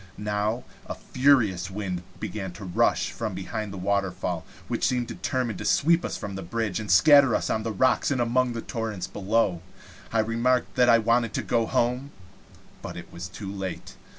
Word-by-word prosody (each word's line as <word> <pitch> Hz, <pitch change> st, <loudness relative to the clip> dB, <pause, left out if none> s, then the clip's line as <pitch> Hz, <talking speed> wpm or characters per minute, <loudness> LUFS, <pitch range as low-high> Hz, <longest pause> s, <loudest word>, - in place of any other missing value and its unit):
Nova 105 Hz, +3 st, -1 dB, 0.2 s
a -, -, -4 dB
furious 115 Hz, -10 st, +2 dB
wind 95 Hz, -3 st, -4 dB, 0.2 s
began 95 Hz, -3 st, -4 dB
to 100 Hz, -, -10 dB
rush 90 Hz, -, +1 dB
out -, -, -13 dB
from 110 Hz, -5 st, -3 dB
behind 100 Hz, +2 st, -4 dB
the 100 Hz, -, -7 dB
waterfall, 95 Hz, -3 st, -1 dB, 0.2 s
which -, -, -3 dB
seemed 125 Hz, -1 st, 0 dB
determined 120 Hz, -4 st, -2 dB
to -, -, -4 dB
sweep 170 Hz, +3 st, +3 dB
us -, -, -3 dB
from 100 Hz, -, -6 dB
the 95 Hz, -, -5 dB
bridge, 110 Hz, +2 st, -2 dB
and 105 Hz, -2 st, -6 dB
scatter 140 Hz, +4 st, +7 dB
us -, -, -1 dB
on 110 Hz, -, 0 dB
the 110 Hz, 0 st, -3 dB
rocks 130 Hz, +6 st, +2 dB
and 135 Hz, -3 st, 0 dB
among 120 Hz, +1 st, +1 dB
the 115 Hz, -, -4 dB
torrents 110 Hz, -5 st, -4 dB
below. 100 Hz, -3 st, 0 dB, 0.5 s
I 115 Hz, -, +3 dB
remarked 115 Hz, +3 st, +1 dB
that 125 Hz, -1 st, +4 dB
I 115 Hz, -, +7 dB
wanted 115 Hz, 0 st, +1 dB
to -, -, -2 dB
go 115 Hz, -2 st, +1 dB
home; 125 Hz, +4 st, 0 dB, 0.7 s
but -, -, -7 dB
it -, -, -10 dB
was 85 Hz, +2 st, -6 dB
too 95 Hz, +1 st, -7 dB
late. 95 Hz, -2 st, -6 dB
110 Hz, 190 wpm, -26 LUFS, 95-120 Hz, 0.7 s, scatter